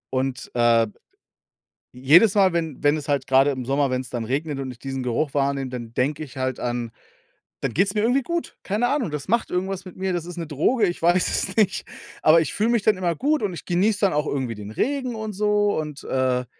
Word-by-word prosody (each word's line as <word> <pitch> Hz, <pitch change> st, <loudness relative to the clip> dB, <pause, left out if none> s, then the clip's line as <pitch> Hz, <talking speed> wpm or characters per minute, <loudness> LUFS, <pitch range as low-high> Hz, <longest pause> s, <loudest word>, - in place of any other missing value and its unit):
Und, 130 Hz, -1 st, -2 dB
äh 120 Hz, -1 st, +4 dB, 1.1 s
jedes 155 Hz, -, +5 dB
Mal, 190 Hz, -3 st, +4 dB
wenn 160 Hz, -5 st, -2 dB
wenn 145 Hz, +1 st, +4 dB
es 155 Hz, -1 st, -6 dB
halt 140 Hz, -2 st, 0 dB
grade 135 Hz, +2 st, +4 dB
im 130 Hz, -2 st, -5 dB
Sommer, 140 Hz, +2 st, +1 dB
wenn's 130 Hz, 0 st, -3 dB
dann 120 Hz, -2 st, -3 dB
regnet 140 Hz, +4 st, -2 dB
und 135 Hz, -1 st, -4 dB
ich 120 Hz, -, -14 dB
diesen 135 Hz, 0 st, -4 dB
Geruch 125 Hz, +4 st, -1 dB
wahrnehme, 140 Hz, -1 st, 0 dB
dann 120 Hz, -2 st, -7 dB
denke 145 Hz, +5 st, -1 dB
ich 145 Hz, -2 st, -11 dB
halt 130 Hz, -1 st, -2 dB
an 120 Hz, -1 st, -3 dB, 0.7 s
dann 135 Hz, -4 st, -2 dB
geht's 190 Hz, -, +2 dB
mir 210 Hz, -, 0 dB
irgendwie 245 Hz, +5 st, +2 dB
gut. 340 Hz, +4 st, -4 dB
Keine 215 Hz, +5 st, 0 dB
Ahnung, 250 Hz, -, 0 dB
das 150 Hz, -1 st, -5 dB
macht 235 Hz, +4 st, 0 dB
irgendwas 190 Hz, +1 st, -2 dB
mit 185 Hz, -, -10 dB
mir, 190 Hz, 0 st, -1 dB
das 175 Hz, -2 st, -2 dB
ist 175 Hz, 0 st, -8 dB
'ne 165 Hz, -2 st, -4 dB
Droge, 185 Hz, -, +2 dB
ich 175 Hz, -, -4 dB
weiß 175 Hz, +2 st, +3 dB
es 190 Hz, -, -2 dB
nicht, 215 Hz, -4 st, +2 dB, 0.4 s
aber 160 Hz, +2 st, +7 dB
ich 160 Hz, -, -3 dB
fühle 215 Hz, +3 st, +1 dB
mich 235 Hz, -2 st, +2 dB
dann 215 Hz, 0 st, +4 dB
immer 175 Hz, -2 st, 0 dB
gut 295 Hz, -, 0 dB
und 200 Hz, -3 st, -1 dB
ich 170 Hz, -, -8 dB
genieße 200 Hz, +4 st, +1 dB
dann 200 Hz, -5 st, +2 dB
auch 150 Hz, +1 st, 0 dB
irgendwie 130 Hz, -6 st, -2 dB
den 105 Hz, 0 st, -8 dB
Regen 260 Hz, -, -1 dB
und 220 Hz, -1 st, -5 dB
so 205 Hz, +1 st, +1 dB
und, 150 Hz, -2 st, -6 dB
äh, 130 Hz, -1 st, 0 dB
155 Hz, 230 wpm, -23 LUFS, 130-195 Hz, 1.1 s, aber